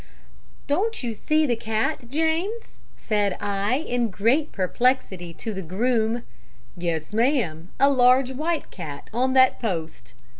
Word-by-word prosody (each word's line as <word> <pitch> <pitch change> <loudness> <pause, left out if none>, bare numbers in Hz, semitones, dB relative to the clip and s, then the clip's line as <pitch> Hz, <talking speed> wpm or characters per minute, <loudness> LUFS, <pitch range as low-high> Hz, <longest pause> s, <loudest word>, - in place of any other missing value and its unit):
"'Don't 420 - 0
you 235 -2 -2
see 310 +8 +1
the 245 -4 +1
cat, 220 +2 -2
James?' 325 - -1 0.2
said 205 -3 0
I 200 +3 0
in 245 -5 -1
great 235 +11 +1
perplexity 190 -3 0
to 220 +7 -5
the 190 - -4
groom. 225 +5 0 0.5
"'Yes, 170 0 -3
ma'am; 215 - 0
a 275 - +6
large 255 -1 +4
white 310 +4 -2
cat 150 -6 -8
on 260 +3 +1
that 260 -1 +5
post.' 165 - -4
235 Hz, 135 wpm, -24 LUFS, 195-270 Hz, 0.5 s, a